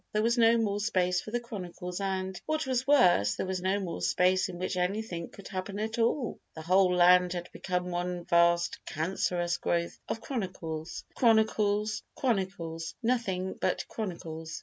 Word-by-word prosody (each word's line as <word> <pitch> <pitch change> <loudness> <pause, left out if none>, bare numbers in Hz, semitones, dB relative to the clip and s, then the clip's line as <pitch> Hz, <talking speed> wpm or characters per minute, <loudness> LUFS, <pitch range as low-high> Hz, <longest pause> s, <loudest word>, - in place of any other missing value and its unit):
There 215 0 +2
was 235 +1 +3
no 230 -1 +5
more 205 -3 0
space 185 -4 +1
for - - -9
the 240 +2 -1
chronicles 180 -5 -6
and, 190 -1 -2
what 310 -1 0
was 260 0 -1
worse, 175 - +5
there - - -2
was 185 -1 -3
no 190 +2 +1
more 175 - -4
space 180 - +2
in 175 - -7
which 185 +1 -2
anything 180 -1 -2
could 200 - -12
happen 190 +1 -5
at 220 +2 -3
all, 235 +2 0 0.2
the 160 - -7
whole 185 +1 +4
land 180 0 +5
had 175 0 -5
become 180 -1 -3
one 175 0 -3
vast 170 0 +3
cancerous 175 +1 -1
growth 170 0 -1
of - - -2
chronicles, 175 - -5
chronicles, 215 -2 +2
chronicles, 185 -8 -2
nothing 195 -6 0
but - - 0
chronicles. 165 -6 -5
185 Hz, 165 wpm, -29 LUFS, 175-215 Hz, 0.2 s, no